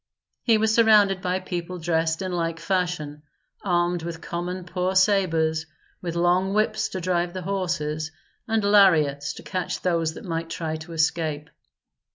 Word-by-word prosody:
He 230 -3 +4
was 220 0 +2
surrounded 210 -4 +5
by 180 +1 0
people 180 -1 -5
dressed 160 0 0
in 185 - -3
like 165 -2 -2
fashion, 165 -4 -2 0.4
armed 175 -2 +1
with 165 0 -5
common 180 +2 -4
poor 180 +1 -2
sabres, 165 -5 +2 0.3
with 170 -2 -4
long 180 +3 +2
whips 215 0 +1
to 190 - -4
drive 175 -1 0
the 185 -1 -5
horses, 160 -5 -2 0.4
and 220 -2 +1
lariats 165 -9 +4
to - - -11
catch 185 -1 -3
those 165 -3 0
that - - -9
might 165 -2 -3
try 160 -1 -3
to 160 +2 -10
escape. 155 -2 -1
175 Hz, 155 wpm, -24 LUFS, 160-185 Hz, 0.4 s, surrounded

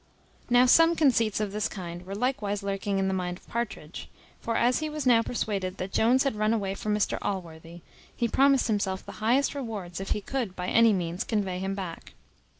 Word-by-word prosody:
Now 245 +1 +6
some 330 +6 +6
conceits 235 -9 +2
of 210 -2 -2
this 210 0 -1
kind 175 -3 -7
were 195 - -5
likewise 210 -4 -1
lurking 200 0 -2
in 195 0 +1
the 190 - 0
mind 180 -1 -2
of - - -23
Partridge; 220 -9 -5 0.3
for, 230 0 -2
as 245 +1 +3
he 310 0 -3
was 305 -2 -4
now 240 -3 +5
persuaded 195 -6 -3
that 185 +1 -5
Jones 250 +4 +4
had 275 -5 -1
run 215 +1 +1
away 195 -3 -2
from 210 +1 -2
Mr 210 - 0
Allworthy, 170 -3 -5 0.3
he 235 - 0
promised 275 +2 +3
himself 200 -4 -1
the - - -8
highest 250 +7 +2
rewards 210 - -5
if 195 - -5
he - - 0
could 235 -6 -3
by 180 0 -3
any 230 -1 +5
means 175 -2 -1
convey 195 -5 -2
him 195 +1 -2
back. 185 -4 -7
210 Hz, 205 wpm, -27 LUFS, 190-240 Hz, 0.3 s, Now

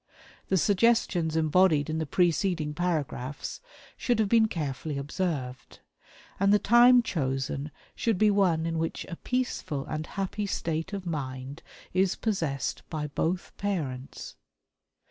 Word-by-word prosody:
The 190 - +2
suggestions 190 -5 +2
embodied 160 -1 +3
in 160 0 -2
the 160 - -2
preceding 170 -1 +1
paragraphs 150 -6 -3 0.3
should 240 -2 0
have 215 -2 +1
been 225 0 +5
carefully 150 -4 -3
observed; 140 -4 -3 0.6
and 195 +1 +4
the 210 - +7
time 240 +3 +6
chosen 135 - -2 0.2
should 225 -4 0
be 210 +2 +4
one 180 -5 +2
in 165 -1 -1
which 165 0 -3
a 170 - -5
peaceful 185 - -2
and 155 0 -4
happy 200 +1 -3
state 165 0 -2
of 200 -2 -5
mind 135 -3 -5 0.3
is 185 0 +2
possessed 160 - -2
by 150 -2 -3
both 175 +5 -2
parents. 145 -10 -4
165 Hz, 130 wpm, -28 LUFS, 150-195 Hz, 0.6 s, the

